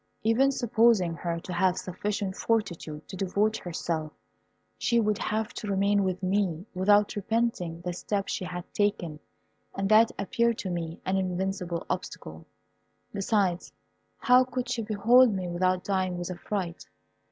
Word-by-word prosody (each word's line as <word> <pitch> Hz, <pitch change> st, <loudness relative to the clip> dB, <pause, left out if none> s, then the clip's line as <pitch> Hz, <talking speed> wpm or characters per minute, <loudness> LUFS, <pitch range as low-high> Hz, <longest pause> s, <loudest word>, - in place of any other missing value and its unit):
Even 240 Hz, +5 st, +4 dB
supposing 225 Hz, -8 st, +3 dB
her 170 Hz, 0 st, -3 dB
to 180 Hz, -, -6 dB
have 185 Hz, +1 st, +2 dB
sufficient 195 Hz, +1 st, -3 dB
fortitude 170 Hz, -10 st, -2 dB
to -, -, -8 dB
devote 200 Hz, +3 st, +1 dB
herself, 160 Hz, -3 st, -3 dB, 0.6 s
she 235 Hz, -1 st, +1 dB
would 215 Hz, -1 st, +1 dB
have 220 Hz, +1 st, -2 dB
to 215 Hz, -, -6 dB
remain 200 Hz, +1 st, +2 dB
with 185 Hz, 0 st, -2 dB
me 185 Hz, -2 st, 0 dB
without 205 Hz, +2 st, +3 dB
repenting 205 Hz, -6 st, -1 dB
the 175 Hz, 0 st, -3 dB
step 200 Hz, +2 st, -2 dB
she -, -, -3 dB
had 180 Hz, -1 st, -5 dB
taken, 190 Hz, -7 st, 0 dB, 0.6 s
and 195 Hz, 0 st, -1 dB
that 220 Hz, +1 st, +6 dB
appeared 235 Hz, +2 st, +1 dB
to 190 Hz, -, -4 dB
me 170 Hz, -1 st, -4 dB
an 190 Hz, +1 st, +1 dB
invincible 185 Hz, -2 st, -2 dB
obstacle. 80 Hz, +1 st, -5 dB, 0.7 s
Besides, 195 Hz, -3 st, 0 dB, 0.5 s
how 250 Hz, +1 st, +5 dB
could 255 Hz, -1 st, -4 dB
she 240 Hz, -2 st, -1 dB
behold 225 Hz, +3 st, +5 dB
me 185 Hz, -2 st, -3 dB
without 185 Hz, +1 st, 0 dB
dying 185 Hz, -2 st, -1 dB
with 175 Hz, +1 st, -4 dB
affright? 180 Hz, -1 st, -4 dB
195 Hz, 145 wpm, -28 LUFS, 175-215 Hz, 0.7 s, that